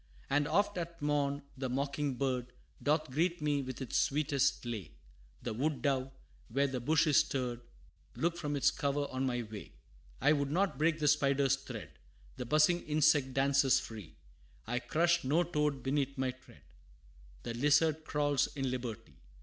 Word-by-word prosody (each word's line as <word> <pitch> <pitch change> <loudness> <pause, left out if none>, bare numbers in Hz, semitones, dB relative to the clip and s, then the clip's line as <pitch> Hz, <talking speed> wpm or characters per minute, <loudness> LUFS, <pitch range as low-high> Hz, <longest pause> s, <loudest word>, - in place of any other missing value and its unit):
And 145 +1 +2
oft 205 0 +1
at 170 0 -6
morn, 145 -1 0
the 130 -1 -3
mocking 140 +1 -1
bird 125 -2 -2 0.3
Doth 155 -1 +1
greet 170 +5 +1
me 145 -2 0
with 130 0 -5
its 125 - 0
sweetest 140 -3 +1
lay; 100 -12 -5 0.5
The - - -3
wood 145 +6 -1
dove, 135 -2 0 0.4
where 140 +5 +2
the 130 -2 -2
bush 155 +6 +3
is 150 -3 +4
stirred, 125 -3 0 0.5
Looks 170 +1 -1
from 145 -3 -2
its 140 - +3
cover 145 0 -1
on 130 +1 -1
my 120 -1 -1
way. 105 -2 -9 0.5
I 150 - +4
would 140 -2 0
not 190 +4 0
break 155 +1 +2
the 150 -1 0
spider's 140 -2 +3
thread, 135 - -9 0.4
The 125 - -5
buzzing 155 +5 +4
insect 145 -3 +3
dances 135 0 +4
free; 105 -7 -9 0.5
I 125 - -1
crush 170 +6 +1
no 150 +7 +2
toad 150 -6 -1
beneath 140 0 -1
my 130 -1 0
tread, 130 - -19 0.8
The 120 - -4
lizard 150 +5 +3
crawls 145 -3 +1
in 135 -2 -1
liberty! 120 -4 -6
140 Hz, 165 wpm, -33 LUFS, 130-150 Hz, 0.8 s, is